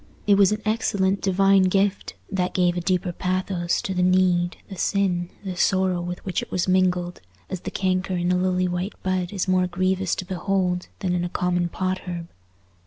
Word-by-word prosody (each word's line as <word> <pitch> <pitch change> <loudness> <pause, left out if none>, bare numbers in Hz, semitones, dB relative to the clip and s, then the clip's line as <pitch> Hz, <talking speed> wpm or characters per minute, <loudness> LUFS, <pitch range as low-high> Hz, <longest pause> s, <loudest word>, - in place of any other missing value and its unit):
It 205 - +5
was 200 -1 +5
an 210 0 -2
excellent 200 -3 +1
divine 195 0 +4
gift, 195 +1 0 0.2
that 185 -2 -1
gave 180 -1 +2
a 175 - -1
deeper 180 0 0
pathos 185 -1 -1
to 190 - -2
the 180 - 0
need, 180 -1 +2
the 195 - -8
sin, 180 -2 0
the 190 -2 -4
sorrow 185 -1 +2
with 175 0 -6
which 185 - -1
it - - -8
was 185 0 -1
mingled, 180 -1 +1 0.3
as 185 - -3
the - - -5
canker 185 -1 -1
in 175 0 0
a - - +3
lily 185 0 +1
white 180 +3 -3
bud 185 -1 -1
is 195 -3 -2
more 185 -1 +3
grievous 185 +1 0
to 185 - -5
behold 180 0 -1
than 185 -2 0
in 175 -1 0
a 175 - -2
common 175 -1 0
pot 185 +1 -2
herb. 170 -1 -5
185 Hz, 195 wpm, -24 LUFS, 180-190 Hz, 0.3 s, It